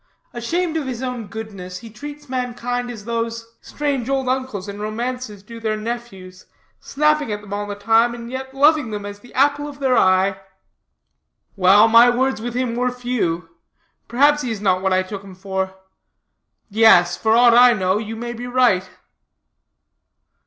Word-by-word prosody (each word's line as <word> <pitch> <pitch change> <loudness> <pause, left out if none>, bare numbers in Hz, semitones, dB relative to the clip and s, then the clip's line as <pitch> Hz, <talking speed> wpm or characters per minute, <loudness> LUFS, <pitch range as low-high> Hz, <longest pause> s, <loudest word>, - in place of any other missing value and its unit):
Ashamed 325 +8 -2
of 295 -4 -3
his 255 -1 -5
own 250 -4 -4
goodness, 195 -4 -8
he 225 +4 -11
treats 290 +6 -10
mankind 245 -1 -3
as 220 -4 -8
those 230 0 -4
strange 280 -4 -3
old 270 -1 0
uncles 255 -7 -2
in 200 0 -7
romances 215 -1 -5
do 230 +2 -10
their 220 -1 -2
nephews 215 -5 -7 0.3
snapping 300 -3 0
at 210 0 -4
them 205 -1 -9
all 205 0 -3
the 205 - -5
time 225 +3 +2
and 235 0 -9
yet 265 0 -6
loving 290 -1 +3
them 205 -1 -5
as 205 0 -8
the 245 - -17
apple 285 +2 +2
of 285 -1 -9
their 265 -2 +1
eye." 190 0 +3 1.2
"Well, 200 +3 +6
my 230 +2 +7
words 260 -1 0
with 240 +1 -5
him 250 -2 -1
were 250 +1 0
few. 235 -10 -2 0.6
Perhaps 290 +5 +3
he 250 - -3
is 220 -3 -3
not 185 -2 +1
what 190 0 0
I 185 0 +2
took 195 +1 -8
him 195 -2 -12
for. 190 0 -4 0.9
Yes, 200 -5 +5
for 220 +4 +1
aught 240 -1 +6
I 245 +1 +7
know, 190 -1 0
you 220 +1 -6
may 240 +1 -5
be 240 +1 -7
right." 245 -8 +2
230 Hz, 175 wpm, -20 LUFS, 205-255 Hz, 1.2 s, my